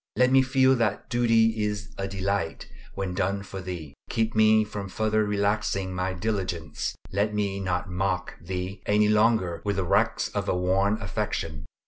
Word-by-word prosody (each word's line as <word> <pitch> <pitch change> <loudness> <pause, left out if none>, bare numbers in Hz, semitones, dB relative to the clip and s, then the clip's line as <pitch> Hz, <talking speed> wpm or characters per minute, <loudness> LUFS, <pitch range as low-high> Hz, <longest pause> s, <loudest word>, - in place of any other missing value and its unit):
Let 125 0 +4
me 135 0 +7
feel 130 0 +4
that 105 +1 -1
duty 115 -2 +3
is 105 0 -3
a 95 - -3
delight 95 -3 -2 0.3
when 95 -2 -3
done 100 +1 -1
for 95 -1 -7
Thee. 85 -6 -6 0.2
Keep 115 0 0
me 110 0 +5
from 105 -2 -6
further 110 +2 +1
relaxing 100 -2 0
my 90 +1 -1
diligence. 90 -4 -3 0.2
Let 105 +2 0
me 100 -2 -1
not 95 0 -1
mock 90 0 -1
Thee 90 +2 -5
any 105 0 +4
longer 105 -5 +2
with 100 -1 -1
the 95 - 0
wrecks - - +2
of - - -3
a - - +1
worn 95 +4 +2
affection. 85 -7 -3
100 Hz, 165 wpm, -26 LUFS, 95-110 Hz, 0.3 s, me